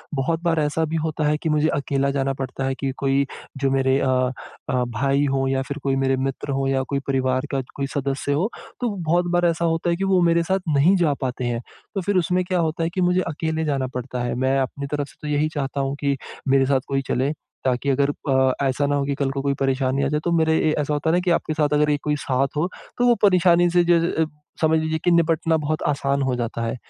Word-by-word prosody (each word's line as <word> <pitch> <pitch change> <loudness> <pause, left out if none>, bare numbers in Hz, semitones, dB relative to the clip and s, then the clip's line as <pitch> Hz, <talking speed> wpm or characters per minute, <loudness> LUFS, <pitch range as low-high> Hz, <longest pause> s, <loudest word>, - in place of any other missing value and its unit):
बहुत 160 +5 0
बार 165 -2 +2
ऐसा 150 +2 0
भी - - -1
होता 155 -1 -2
है 150 0 +2
कि 160 - -3
मुझे 150 0 +2
अकेला 140 0 0
जाना 135 0 0
पड़ता 135 0 -5
है 135 0 -1
कि 135 -1 -1
कोई 135 0 +1 0.4
जो 135 - +2
मेरे 135 0 +2
अ - - 0 0.6
अ, 125 -1 +1
भाई 135 +4 +1
हो 135 0 +1
या 135 0 +1
फ़िर 140 +2 -5
कोई 135 -1 +1
मेरे 135 0 +2
मित्र 135 +1 -4
हो 135 0 0
या 135 0 +1
कोई 140 - 0
परिवार 130 0 0
का 135 -2 0
कोई 140 -1 -2
सदस्य 140 0 -1
हो, 175 +9 +1 0.3
तो 245 - +1
बहुत 175 0 +1
बार 175 0 +3
ऐसा 170 0 +1
होता 165 +1 0
है 170 - +2
कि 190 - -3
वो 190 -2 +3
मेरे 170 0 +3
साथ 190 +3 0 0.2
नहीं 160 +8 +5
जा 165 -5 +2
पाते 130 -1 -2
हैं। 120 -1 -1 0.3
तो 195 - 0
फ़िर 200 +2 -1
उसमें 180 +1 +1
क्या 180 0 0
होता 165 0 0
है 165 - 0
कि 185 - -1
मुझे 180 +1 +3
अकेले 160 0 -2
जाना 135 -3 0
पड़ता 125 0 -4
है। 120 - -2
मैं 130 +2 +1
अपनी 140 +2 -3
तरफ 145 -1 -1
से - - -18
तो 150 - -6
यही 150 +1 +1
चाहता 140 -1 -2
हूँ 135 +1 -2
कि 140 -1 0 0.3
मेरे 135 0 +4
साथ 135 0 +2
कोई 135 0 0
चले 130 +3 0 0.3
ताकि 130 +2 0
अगर 140 +1 +2 0.2
अ, 130 -1 +4 0.2
ऐसा 135 +2 0
ना 145 - +1
हो 140 - +1
कि 140 0 -1
कल 140 -1 -1
को 135 0 -3
कोई 140 0 0
परेशानी 135 0 +1
आ - - +2
जाए 150 +2 0
तो 170 - 0
मेरे 160 -1 +3
ए - - +2
ऐसा 150 0 -1
होता 150 +2 0
है - - +2
ना - - +3
कि 180 -1 0
आपके 165 -2 0
साथ 150 -1 +1
अगर 150 0 +3
कोई 150 0 +1
साथ 135 +1 +1
हो, 160 +4 +1 0.3
तो 245 - +2
वो 240 - +5
परेशानी 175 -3 +5
से 175 0 +3
ज 170 -1 +5 0.2
अ, 160 - +4 0.4
समझ 160 0 +4
लीजिए 160 0 -1
कि 175 - +3
निपटना 165 -1 +2
बहुत 155 0 -2
आसान 140 -1 0
हो 130 -1 0
जाता 115 -1 -3
है। 115 +3 -2
145 Hz, 255 wpm, -22 LUFS, 135-165 Hz, 0.6 s, नहीं